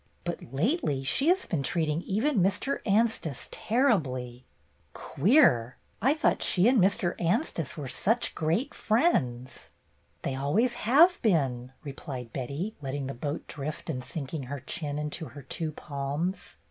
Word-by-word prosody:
But 175 Hz, -1 st, -5 dB
lately 150 Hz, -, 0 dB
she 270 Hz, -, +2 dB
has 370 Hz, +2 st, +3 dB
been 160 Hz, -, -1 dB
treating 155 Hz, +2 st, 0 dB
even 220 Hz, +7 st, 0 dB
Mr. 200 Hz, +9 st, +1 dB
Anstice 205 Hz, -, +1 dB
terribly." 130 Hz, -, 0 dB, 0.5 s
"Queer! 135 Hz, -, +3 dB, 0.2 s
I 275 Hz, +5 st, +3 dB
thought 320 Hz, -, +1 dB
she 185 Hz, +3 st, +3 dB
and 250 Hz, -1 st, +5 dB
Mr. 185 Hz, -2 st, +2 dB
Anstice 170 Hz, -, -1 dB
were 145 Hz, -3 st, -5 dB
such 225 Hz, -, 0 dB
great 170 Hz, -, 0 dB
friends." 130 Hz, -, 0 dB, 0.5 s
"They -, -, -1 dB
always 170 Hz, -, +1 dB, 0.2 s
have 335 Hz, +8 st, +6 dB
been," 135 Hz, -, +1 dB
replied 135 Hz, -4 st, -7 dB
Betty, 140 Hz, -, -3 dB
letting 135 Hz, 0 st, -3 dB
the 135 Hz, -, -4 dB
boat 145 Hz, +5 st, -4 dB
drift 150 Hz, +2 st, -5 dB
and 125 Hz, -4 st, -4 dB
sinking 140 Hz, 0 st, -5 dB
her 140 Hz, +1 st, -6 dB
chin 145 Hz, +2 st, -3 dB
into 150 Hz, +2 st, -3 dB
her 145 Hz, -2 st, -11 dB
two 160 Hz, +3 st, -3 dB
palms. 145 Hz, +6 st, -4 dB
155 Hz, 140 wpm, -28 LUFS, 135-220 Hz, 0.5 s, have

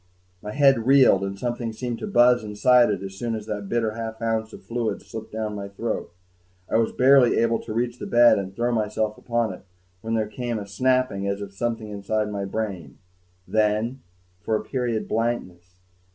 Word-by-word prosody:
My 105 Hz, -, -6 dB
head 135 Hz, -3 st, +3 dB
reeled, 130 Hz, -8 st, +6 dB
and 100 Hz, 0 st, -4 dB
something 120 Hz, 0 st, -3 dB
seemed 120 Hz, +1 st, -4 dB
to -, -, -5 dB
buzz 125 Hz, -, +4 dB
inside 120 Hz, +4 st, +4 dB
it 100 Hz, -2 st, -2 dB
as 95 Hz, 0 st, -6 dB
soon 115 Hz, -1 st, -2 dB
as 110 Hz, -1 st, -6 dB
the 105 Hz, -1 st, -4 dB
bitter 110 Hz, +2 st, -1 dB
half 110 Hz, 0 st, -6 dB
ounce 110 Hz, -1 st, -1 dB
of -, -, -12 dB
fluid 115 Hz, -1 st, -3 dB
slipped 110 Hz, 0 st, -8 dB
down 110 Hz, -1 st, -3 dB
my 100 Hz, -1 st, -5 dB
throat. 100 Hz, +1 st, -4 dB, 0.6 s
I -, -, +1 dB
was 115 Hz, -1 st, +1 dB
barely 130 Hz, -1 st, +5 dB
able 115 Hz, 0 st, +2 dB
to -, -, -8 dB
reach 120 Hz, +2 st, -2 dB
the -, -, -5 dB
bed 120 Hz, -3 st, +6 dB
and 95 Hz, 0 st, -6 dB
throw 120 Hz, +2 st, 0 dB
myself 110 Hz, -1 st, -1 dB
upon 115 Hz, -4 st, -1 dB
it -, -, -11 dB, 0.4 s
when 115 Hz, 0 st, -2 dB
there 110 Hz, -1 st, +1 dB
came 120 Hz, +1 st, -4 dB
a 105 Hz, -, -5 dB
snapping 125 Hz, -1 st, 0 dB
as 100 Hz, 0 st, -1 dB
of 100 Hz, -1 st, -7 dB
something 110 Hz, 0 st, -3 dB
inside 105 Hz, +1 st, -2 dB
my 100 Hz, -1 st, -3 dB
brain... 95 Hz, -, -4 dB, 0.5 s
then, 110 Hz, +4 st, 0 dB, 0.4 s
for 110 Hz, -, 0 dB
a -, -, -2 dB
period, 120 Hz, -4 st, -2 dB
blankness 90 Hz, -6 st, -3 dB
110 Hz, 195 wpm, -24 LUFS, 105-120 Hz, 0.6 s, reeled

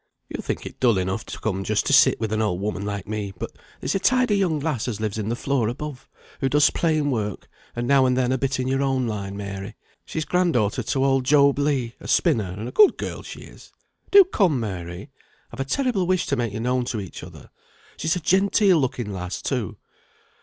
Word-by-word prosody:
"You'll -, -, -5 dB
think -, -, -4 dB
it -, -, -9 dB
dull 120 Hz, -5 st, +3 dB
enough 95 Hz, +3 st, -2 dB
to -, -, -7 dB
come 95 Hz, -3 st, -2 dB
just 105 Hz, +1 st, 0 dB
to -, -, +1 dB
sit -, -, +6 dB
with 110 Hz, -1 st, -2 dB
an 110 Hz, -, +1 dB
old 105 Hz, -5 st, 0 dB
woman 105 Hz, 0 st, -3 dB
like 100 Hz, -2 st, -4 dB
me, 105 Hz, -2 st, -3 dB
but -, -, -5 dB, 0.3 s
there's -, -, -2 dB
a 195 Hz, -, +1 dB
tidy 255 Hz, -1 st, +3 dB
young 180 Hz, -6 st, +1 dB
lass 145 Hz, -7 st, -2 dB
as 110 Hz, -4 st, -3 dB
lives 110 Hz, 0 st, -2 dB
in 105 Hz, 0 st, -3 dB
the 120 Hz, -, 0 dB
floor 130 Hz, -2 st, 0 dB
above, 135 Hz, +2 st, -6 dB, 0.3 s
who 135 Hz, -, 0 dB
does 145 Hz, +2 st, +4 dB
plain 155 Hz, -4 st, +1 dB
work, 105 Hz, -5 st, -3 dB, 0.3 s
and 120 Hz, 0 st, -2 dB
now 135 Hz, -1 st, +5 dB
and 125 Hz, 0 st, +1 dB
then 130 Hz, -1 st, +1 dB
a 130 Hz, -, +1 dB
bit 135 Hz, 0 st, -1 dB
in 130 Hz, -, -1 dB
your 135 Hz, +1 st, 0 dB
own 135 Hz, -2 st, +1 dB
line, 100 Hz, -3 st, -4 dB
Mary; 100 Hz, +1 st, -6 dB, 0.3 s
she's 160 Hz, -1 st, -4 dB
grand 180 Hz, -2 st, +1 dB
daughter 105 Hz, -4 st, +1 dB
to 135 Hz, -1 st, 0 dB
old 135 Hz, -1 st, +2 dB
Job 140 Hz, 0 st, +4 dB
Legh, 135 Hz, -5 st, 0 dB
a -, -, -10 dB
spinner, 100 Hz, -5 st, +2 dB
and 110 Hz, +3 st, -5 dB
a -, -, -6 dB
good 420 Hz, -2 st, +5 dB
girl -, -, -5 dB
she -, -, -9 dB
is. -, -, -15 dB, 0.4 s
Do 400 Hz, 0 st, +9 dB
come, 190 Hz, -, +1 dB
Mary! 95 Hz, -, -6 dB, 0.4 s
I've -, -, -11 dB
a 135 Hz, -, -1 dB
terrible 225 Hz, -, 0 dB
wish 185 Hz, -1 st, +1 dB
to 140 Hz, -, 0 dB
make 120 Hz, -3 st, -1 dB
you 110 Hz, -, -4 dB
known 125 Hz, +1 st, 0 dB
to 115 Hz, -2 st, -3 dB
each 95 Hz, -3 st, -8 dB
other. -, -, -12 dB, 0.4 s
She's 160 Hz, +3 st, 0 dB
a -, -, -1 dB
genteel 195 Hz, +1 st, +3 dB
looking 120 Hz, -6 st, -2 dB
lass, 90 Hz, 0 st, -4 dB
too." 125 Hz, -9 st, -3 dB
125 Hz, 230 wpm, -23 LUFS, 105-150 Hz, 0.4 s, Do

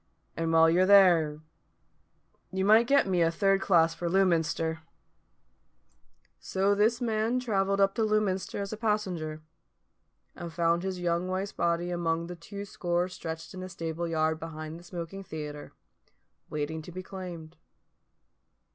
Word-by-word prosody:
And 165 Hz, 0 st, -1 dB
while 165 Hz, 0 st, +6 dB
you're 180 Hz, +3 st, +3 dB
there, 170 Hz, -7 st, +5 dB, 1.1 s
you 190 Hz, 0 st, -1 dB
might 220 Hz, +3 st, +6 dB
get 280 Hz, +1 st, +4 dB
me 180 Hz, -2 st, +1 dB
a 165 Hz, -, +4 dB
third 195 Hz, +3 st, +2 dB
class 165 Hz, -4 st, +4 dB
for 170 Hz, +1 st, -3 dB
Lewminster." 165 Hz, -3 st, +1 dB, 1.6 s
So 195 Hz, +2 st, +1 dB
this 220 Hz, +4 st, +2 dB
man 225 Hz, +1 st, 0 dB
travelled 200 Hz, -5 st, 0 dB
up 195 Hz, 0 st, +4 dB
to 225 Hz, -, -2 dB
Lewminster 210 Hz, -4 st, 0 dB
as 200 Hz, +1 st, -4 dB
passenger, 185 Hz, -8 st, -2 dB, 0.9 s
and 170 Hz, -1 st, -7 dB
found 170 Hz, +1 st, +1 dB
his 190 Hz, -1 st, -3 dB
young 175 Hz, 0 st, 0 dB
wife's 190 Hz, +2 st, -2 dB
body 170 Hz, +1 st, -1 dB
among 165 Hz, -1 st, -1 dB
the 175 Hz, +1 st, -7 dB
two 200 Hz, +4 st, -8 dB
score 175 Hz, -2 st, -1 dB
stretched 165 Hz, -1 st, -7 dB
in 185 Hz, -, -7 dB
a 185 Hz, -, -6 dB
stable 165 Hz, -1 st, -4 dB
yard 160 Hz, -1 st, 0 dB
behind 155 Hz, 0 st, -7 dB
the -, -, -15 dB
smoking 175 Hz, +2 st, -7 dB
theatre, 150 Hz, -4 st, -7 dB, 0.8 s
waiting 150 Hz, +1 st, -3 dB
to 165 Hz, -, -10 dB
be 185 Hz, +2 st, -7 dB
claimed. 180 Hz, -4 st, -8 dB
175 Hz, 145 wpm, -29 LUFS, 165-195 Hz, 1.6 s, while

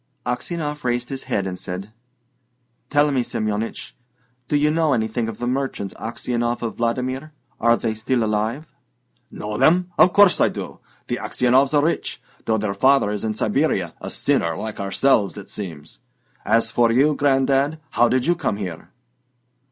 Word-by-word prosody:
Aksionov 150 Hz, +4 st, -3 dB
raised 120 Hz, 0 st, -1 dB
his 135 Hz, -1 st, -6 dB
head 105 Hz, -7 st, -1 dB
and 90 Hz, -1 st, -5 dB
said: 95 Hz, +4 st, -6 dB, 1.0 s
"Tell 145 Hz, 0 st, +3 dB
me, 130 Hz, -2 st, +1 dB
Semyonich, 110 Hz, -1 st, -3 dB, 0.6 s
do -, -, 0 dB
you 150 Hz, +1 st, +3 dB
know 160 Hz, -2 st, +2 dB
anything 110 Hz, 0 st, -1 dB
of 110 Hz, -, -7 dB
the 120 Hz, -, -4 dB
merchants 125 Hz, -6 st, -2 dB
Aksionov 120 Hz, +1 st, -3 dB
of 115 Hz, -, -4 dB
Vladimir? 130 Hz, +5 st, -2 dB, 0.3 s
Are 115 Hz, +1 st, +4 dB
they 115 Hz, -2 st, -1 dB
still 120 Hz, +2 st, 0 dB
alive?" 110 Hz, +7 st, -1 dB, 0.6 s
"Know 105 Hz, 0 st, -5 dB
them? 180 Hz, +2 st, +3 dB
Of 180 Hz, -, +7 dB
course 205 Hz, -2 st, +5 dB
I -, -, +5 dB
do. -, -, -7 dB, 0.3 s
The -, -, -2 dB
Aksionovs 130 Hz, +4 st, +2 dB
are 145 Hz, -, +4 dB
rich, 170 Hz, -, -2 dB, 0.3 s
though 110 Hz, -, +2 dB
their 105 Hz, -1 st, -1 dB
father 130 Hz, +1 st, +3 dB
is 105 Hz, -1 st, -3 dB
in 110 Hz, -1 st, -1 dB
Siberia: 105 Hz, -, 0 dB
a -, -, -5 dB
sinner 85 Hz, -1 st, 0 dB
like 110 Hz, -1 st, -5 dB
ourselves, 100 Hz, +1 st, +1 dB
it 100 Hz, -, -9 dB
seems! 80 Hz, -7 st, -7 dB, 0.5 s
As 115 Hz, 0 st, +2 dB
for 120 Hz, -1 st, +3 dB
you, 140 Hz, +6 st, +4 dB
Gran'dad, 140 Hz, +1 st, +2 dB
how 120 Hz, 0 st, +3 dB
did 130 Hz, 0 st, +1 dB
you 175 Hz, -, +4 dB
come 155 Hz, -, -2 dB
here?" 90 Hz, -6 st, -6 dB
120 Hz, 165 wpm, -22 LUFS, 105-140 Hz, 1.0 s, Of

